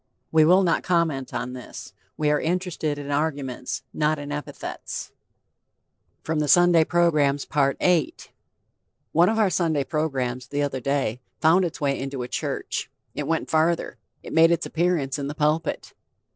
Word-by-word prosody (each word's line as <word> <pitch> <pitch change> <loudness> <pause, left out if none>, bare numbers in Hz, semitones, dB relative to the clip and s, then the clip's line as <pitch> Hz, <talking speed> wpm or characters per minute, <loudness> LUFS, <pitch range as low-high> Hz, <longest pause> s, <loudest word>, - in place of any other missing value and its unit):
We 160 -1 +5
will 185 +4 +5
not 170 -2 +2
comment 165 -7 0
on 125 +1 -4
this. 125 -1 -9 0.2
We 150 -1 +1
are 150 - +1
interested 170 -3 -1
in 145 0 -6
arguments, 140 -4 -2
not 155 0 +1
in 145 0 -7
epithets. 150 0 -6 1.1
VIII 160 -1 0
One 150 -1 0 2.8
of 220 - 0
our 215 -3 +3
Sunday 160 -6 +1
programs, 130 -5 -2
the 145 +2 -1
other 140 -2 -2
day, 135 -3 -1 0.2
found 170 +4 +4
its 170 - -5
way 140 -2 0
into 135 -1 -4
a - - -5
church. - - -3 0.2
It 150 - -4
went 165 0 -1
farther; 165 +2 +1 0.2
it - - -8
made 165 0 +6
its 170 - +1
appearance 160 -5 0
in 140 - -3
the 145 - -5
pulpit. 150 +2 -1
150 Hz, 145 wpm, -24 LUFS, 140-165 Hz, 2.8 s, made